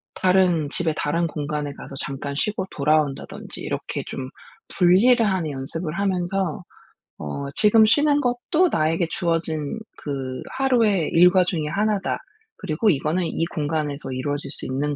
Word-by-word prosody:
다른 180 Hz, -5 st, +3 dB
집에 165 Hz, -3 st, 0 dB
다른 165 Hz, +3 st, 0 dB
공간에 150 Hz, -1 st, -3 dB
가서 135 Hz, -, -10 dB
잠깐 140 Hz, 0 st, -5 dB
쉬고 210 Hz, 0 st, -1 dB
돌아온다든지 150 Hz, -1 st, -1 dB
이렇게 -, -, -4 dB
좀 130 Hz, -1 st, -5 dB, 0.5 s
분리를 215 Hz, +7 st, +5 dB
하는 185 Hz, -6 st, 0 dB
연습을 155 Hz, +4 st, -4 dB
하면서 190 Hz, -2 st, -1 dB, 0.5 s
어 75 Hz, -, -5 dB
'지금 220 Hz, +1 st, +5 dB
쉬는 290 Hz, +5 st, +3 dB
것도 260 Hz, +8 st, +1 dB
나에게 165 Hz, +2 st, +1 dB
주어진 165 Hz, 0 st, -1 dB, 0.2 s
그 135 Hz, -3 st, -5 dB, 0.2 s
하루의 230 Hz, -, +2 dB
일과 180 Hz, +2 st, +6 dB
중에 170 Hz, -4 st, -1 dB
1 210 Hz, +5 st, +1 dB
다. -, -, -2 dB, 0.4 s
그리고 190 Hz, +4 st, 0 dB
이거는 160 Hz, +2 st, +1 dB
이 165 Hz, 0 st, -1 dB
공간에서 150 Hz, -4 st, -3 dB
이루어질 140 Hz, +2 st, -3 dB
수 -, -, 0 dB
있는 145 Hz, +3 st, -2 dB
165 Hz, 305 characters per minute, -23 LUFS, 145-195 Hz, 0.5 s, 일과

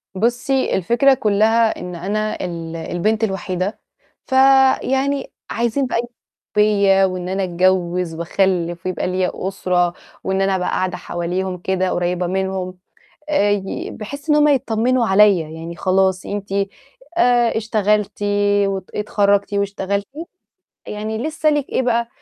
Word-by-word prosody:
بُصّي 245 Hz, +6 st, 0 dB
الفكرة 240 Hz, +9 st, +3 dB
كلّها 220 Hz, 0 st, +2 dB
إن 180 Hz, 0 st, -6 dB
أنا 210 Hz, +4 st, -2 dB
ال 165 Hz, -2 st, -6 dB
البنت 175 Hz, +7 st, -1 dB
الوحيدة 190 Hz, -1 st, -2 dB, 0.5 s
فيعني 265 Hz, +1 st, +3 dB, 0.2 s
عايزين 235 Hz, +4 st, 0 dB
بقى -, -, -1 dB
ي -, -, +2 dB, 0.5 s
بيّا 200 Hz, -2 st, +4 dB
وإن 185 Hz, -1 st, -3 dB
أنا 195 Hz, +1 st, -1 dB
أتجوّز 180 Hz, -1 st, +1 dB
وأخلّف 175 Hz, 0 st, -1 dB
ويبقى 185 Hz, -1 st, -2 dB
لي 185 Hz, 0 st, 0 dB
أسرة 180 Hz, -2 st, 0 dB, 0.3 s
وإن 190 Hz, 0 st, 0 dB
أنا 195 Hz, 0 st, +2 dB
أبقى 180 Hz, -1 st, -1 dB
قاعدة 185 Hz, -1 st, -1 dB
حواليهم 180 Hz, +2 st, -3 dB
كده 185 Hz, +1 st, -1 dB
قريّبة 175 Hz, 0 st, -1 dB
منهم 190 Hz, 0 st, -2 dB, 0.5 s
آآ، 205 Hz, -9 st, +2 dB
ي 200 Hz, -2 st, -2 dB
بحيث 280 Hz, +8 st, -7 dB
إن 300 Hz, -, +5 dB
هُم 300 Hz, 0 st, +5 dB
يطمّنوا 245 Hz, -2 st, +1 dB
عليّا، 190 Hz, -5 st, +4 dB
يعني 165 Hz, +1 st, -8 dB
خلاص 190 Hz, 0 st, +1 dB
أنتِ 200 Hz, -1 st, -5 dB, 0.7 s
آآ 240 Hz, -7 st, +3 dB
اشتغلتِ 210 Hz, -2 st, 0 dB, 0.4 s
وأت 195 Hz, -1 st, -4 dB
أتخرّجتِ 205 Hz, -1 st, +1 dB
واشتغلتِ 200 Hz, 0 st, -1 dB, 0.8 s
يعني 215 Hz, +1 st, -4 dB
لسه 310 Hz, +4 st, 0 dB
لِك 295 Hz, -2 st, -1 dB
إيه -, -, 0 dB
بقى، 235 Hz, -1 st, 0 dB
195 Hz, 130 wpm, -19 LUFS, 185-225 Hz, 0.8 s, إن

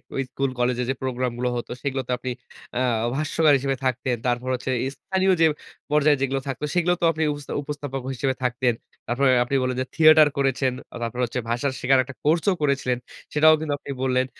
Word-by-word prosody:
ওই 135 Hz, -, 0 dB
স্কুল 135 Hz, -1 st, -1 dB
কলেজে 125 Hz, 0 st, +1 dB
যে -, -, +2 dB
প্রোগ্রামগুলো 125 Hz, -1 st, -2 dB
হত 120 Hz, -, -4 dB, 0.2 s
সেগুলোতে 135 Hz, -3 st, -2 dB
আপনি 130 Hz, 0 st, -4 dB, 0.5 s
আ -, -, +1 dB, 0.4 s
ভাষ্যকার 155 Hz, 0 st, +2 dB
হিসেবে 135 Hz, 0 st, -1 dB
থাকতেন। 130 Hz, 0 st, 0 dB
তারপর 120 Hz, +1 st, -1 dB
হচ্ছে 130 Hz, +1 st, -4 dB, 0.2 s
স্থানীয় 190 Hz, 0 st, 0 dB
যে 165 Hz, -, +7 dB, 0.5 s
পর্যায়ে 150 Hz, -1 st, +4 dB
যেগুলো 135 Hz, 0 st, 0 dB
থাকতো, 135 Hz, +2 st, -3 dB
সেগুলো 175 Hz, 0 st, +3 dB
তোও 170 Hz, -, +3 dB
আপনি 160 Hz, +1 st, -1 dB
উপস্থা 145 Hz, -1 st, -7 dB
উপস্থাপক 145 Hz, -2 st, -5 dB
হিসেবে 130 Hz, +1 st, -1 dB
থাকতেন। 125 Hz, -1 st, +1 dB, 0.3 s
তারপরে 130 Hz, +3 st, +2 dB
আপনি 130 Hz, +3 st, -2 dB
বললেন 130 Hz, 0 st, -1 dB
যে -, -, -2 dB
থিয়েটার 155 Hz, -1 st, +7 dB
করেছেন, 135 Hz, -1 st, +1 dB, 0.2 s
আ -, -, -9 dB
তারপরে 125 Hz, +2 st, -3 dB
হচ্ছে 120 Hz, +1 st, -4 dB
ভাষা 120 Hz, +4 st, 0 dB
শেখার 130 Hz, +1 st, +4 dB
একটা 135 Hz, +1 st, -10 dB
কোর্সও 165 Hz, +6 st, +3 dB
করেছিলেন। 140 Hz, -4 st, +1 dB, 0.4 s
সেটাও 155 Hz, +1 st, +6 dB
কিন্তু 155 Hz, -2 st, -2 dB
আপনি 140 Hz, -, -7 dB
বললেন। 130 Hz, 0 st, +2 dB
135 Hz, 185 wpm, -24 LUFS, 125-150 Hz, 0.5 s, যে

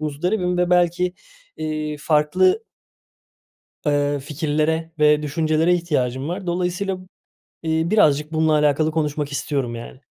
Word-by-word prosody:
muzdaribim 180 Hz, +5 st, -1 dB
ve 180 Hz, 0 st, +1 dB
belki, 180 Hz, +1 st, +2 dB, 0.4 s
eee, 155 Hz, -1 st, -3 dB
farklı 165 Hz, -, +2 dB, 1.2 s
eee, 145 Hz, -1 st, +1 dB
fikirlere 155 Hz, +2 st, -1 dB
ve 150 Hz, 0 st, +4 dB
düşüncelere 155 Hz, +3 st, +1 dB
ihtiyacım 140 Hz, -6 st, -1 dB
var. 180 Hz, +1 st, -5 dB
Dolayısıyla, 180 Hz, +2 st, -1 dB, 0.7 s
eee, 160 Hz, 0 st, +1 dB
birazcık 150 Hz, -7 st, +3 dB
bununla 160 Hz, 0 st, +2 dB
alakalı 150 Hz, +1 st, +2 dB
konuşmak 150 Hz, -2 st, -2 dB
istiyorum, 135 Hz, -4 st, -2 dB
yani. 120 Hz, +3 st, -10 dB
155 Hz, 110 wpm, -21 LUFS, 150-175 Hz, 1.2 s, ve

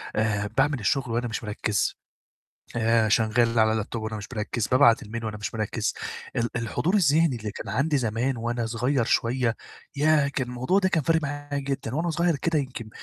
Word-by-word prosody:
آآ 105 Hz, -2 st, 0 dB
باعمل 135 Hz, +5 st, +1 dB
الشُغل 125 Hz, +4 st, 0 dB
وأنا 120 Hz, +1 st, 0 dB
مش 110 Hz, -, -4 dB
مركّز، 105 Hz, 0 st, -1 dB, 0.7 s
ف -, -, -4 dB, 0.3 s
شغّال 115 Hz, +1 st, +2 dB
على 110 Hz, 0 st, +4 dB
لاب 110 Hz, -1 st, -3 dB
توب 115 Hz, -2 st, -4 dB
وأنا 110 Hz, 0 st, -4 dB
مش 105 Hz, -, -7 dB
مركّز، 115 Hz, +1 st, -2 dB
بابعت 125 Hz, -3 st, +5 dB
الmail 115 Hz, +2 st, -6 dB
وأنا 110 Hz, -1 st, -4 dB
مش 105 Hz, -, -5 dB
مركّز. 110 Hz, -2 st, -1 dB, 0.4 s
ال 120 Hz, 0 st, 0 dB
الحضور 120 Hz, -, 0 dB
الذِهني 160 Hz, -6 st, +3 dB
اللي 110 Hz, -2 st, -5 dB
كان -, -, -7 dB
عندي 145 Hz, +3 st, +1 dB
زمان 120 Hz, +2 st, -1 dB
وأنا 120 Hz, 0 st, -2 dB
صغيّر 125 Hz, +3 st, 0 dB
شوية، 120 Hz, 0 st, +1 dB, 0.4 s
ياه! 150 Hz, 0 st, +3 dB
كان 135 Hz, -3 st, -2 dB
الموضوع 125 Hz, +10 st, +1 dB
ده 190 Hz, -1 st, +1 dB
كان 160 Hz, -4 st, +1 dB
فارق 165 Hz, +3 st, +2 dB
معايا 145 Hz, 0 st, -3 dB
جدًا، 135 Hz, -3 st, -3 dB
وأنا 170 Hz, +3 st, 0 dB
صغيّر 170 Hz, +1 st, +1 dB
كده 165 Hz, +1 st, +1 dB
يمكن 130 Hz, -5 st, -5 dB
120 Hz, 190 wpm, -26 LUFS, 110-145 Hz, 0.7 s, بابعت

